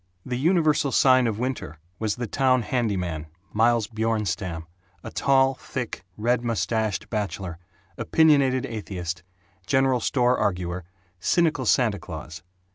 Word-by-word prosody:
The 125 - -3
universal 155 -3 +2
sign 130 -2 +5
of 110 -2 -2
winter 120 - -3 0.2
was 110 -2 -1
the 120 - -3
town 130 +2 +2
handyman 90 -10 -1 0.3
Miles 115 0 +3
Bjornstam, 100 -7 -2 0.4
a - - -7
tall, 135 -1 +3
thick, 125 -4 -6
red 120 +3 +1
mustached 110 -2 -1
bachelor, 95 -5 -3 0.4
opinionated 140 -5 +3
atheist, 95 -6 -5 0.5
general 135 -2 +3
store 125 +1 +2
arguer, 90 -4 -1 0.3
cynical 155 - +1
Santa 110 -5 +3
Claus. 80 -1 -8
115 Hz, 120 wpm, -25 LUFS, 95-130 Hz, 0.5 s, sign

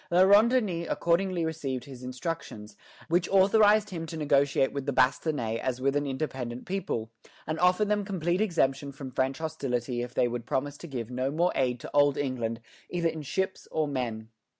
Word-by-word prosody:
La 175 +2 +5
Ronde 205 +4 +7
Denys 185 -9 0
accordingly 170 0 +1
received 140 -6 -3
his 130 -3 -10
instructions, 125 -4 -5 0.3
which 170 +1 +1
authorized 205 +2 +5
him 165 -2 -5
to 160 - -6
negotiate 140 -2 +2
with 140 0 -4
the - - +2
"Bastonnais" 130 -3 +1
as 130 -1 -2
with 135 +2 +1
an 145 0 0
independent 130 -3 -4
people, 120 - -3 0.3
and 155 +2 -3
offer 180 +4 +4
them 210 0 +1
complete 180 -2 -1
exemption 140 -8 +1
from 135 -1 -8
French 130 +1 0
hostility 130 -6 -2
if 125 0 -6
they 125 - +3
would 120 0 -5
promise 145 +2 -1
to 170 - -8
give 125 -5 -5
no 130 +2 -1
more 170 +5 +1
aid 125 -2 0
to - - -8
Old 145 -1 +4
England 120 -5 -2 0.3
either 170 -2 0
in 160 -1 -5
ships 190 +7 -3
or 155 -1 0
men. 115 -5 -3
145 Hz, 185 wpm, -28 LUFS, 130-175 Hz, 0.3 s, Ronde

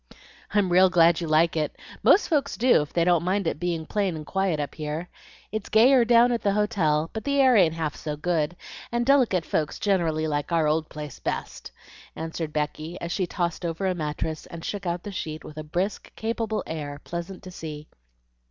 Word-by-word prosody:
"I'm 195 -3 +3
real 185 +1 +6
glad 170 -1 +4
you 165 - -3
like 160 +2 +3
it; 155 -2 -1 0.3
most 405 - +5
folks 285 -3 0
do, 245 -8 +5
if 150 - -6
they 170 - +2
don't 175 -2 +3
mind 190 +2 0
it 160 - -1
being 170 -2 -2
plain 200 -3 -1
and 155 -1 -7
quiet 190 -4 0
up 145 - -3
here. 155 +3 -5 0.4
It's 215 0 -4
gayer 240 +3 +6
down 240 +1 +5
at 235 - 0
the 200 - +1
hotel, 170 -7 +1
but 220 - -4
the 280 0 +1
air 260 -2 +6
ain't 170 -6 +4
half 160 -2 -2
so 150 -2 -5
good, 165 0 0 0.4
and 240 0 0
delicate 245 - +3
folks 155 -2 -1
generally 165 -6 +1
like 145 +1 -2
our 165 -2 +3
old 155 +1 0
place 150 -4 -8
best," - - -5 0.4
answered 160 -1 -4
Becky, 155 +3 -3
as 170 - -5
she 185 -1 -1
tossed 175 -1 -2
over 170 +2 -2
a 185 - +2
mattress 155 -1 -4
and 165 -1 -9
shook 200 -3 -4
out 175 0 -2
the 205 - -6
sheet 155 -4 -5
with 155 - -11
a - - -5
brisk, 180 +7 -3
capable 225 -1 -2
air 145 -3 -5
pleasant 175 +3 -6
to 185 - -9
see. 155 -3 -7
170 Hz, 205 wpm, -25 LUFS, 155-200 Hz, 0.4 s, real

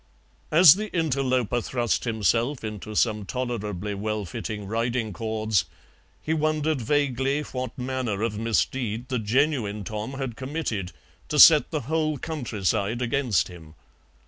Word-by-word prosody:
As 160 -1 +9
the 215 0 -4
interloper 130 -6 +1
thrust 120 0 -1
himself 115 - 0
into 105 0 -6
some 105 -1 +1
tolerably 105 -4 -3
well 105 +1 -3
fitting 105 +4 -5
riding 115 +1 -1
cords 110 -3 0 0.5
he 160 - -2
wondered 155 -2 0
vaguely 140 +2 0
what 130 -3 -5
manner 125 -5 -2
of 115 -2 -1
misdeed 115 +1 -1
the 125 -2 0
genuine 110 -2 0
Tom 110 +5 -5
had 135 -4 -4
committed 130 - -3 0.4
to - - -1
set - - +8
the - - -2
whole 155 +3 -1
countryside 115 - -2
against 125 -3 +1
him. 80 -3 -13
120 Hz, 130 wpm, -25 LUFS, 105-135 Hz, 0.5 s, As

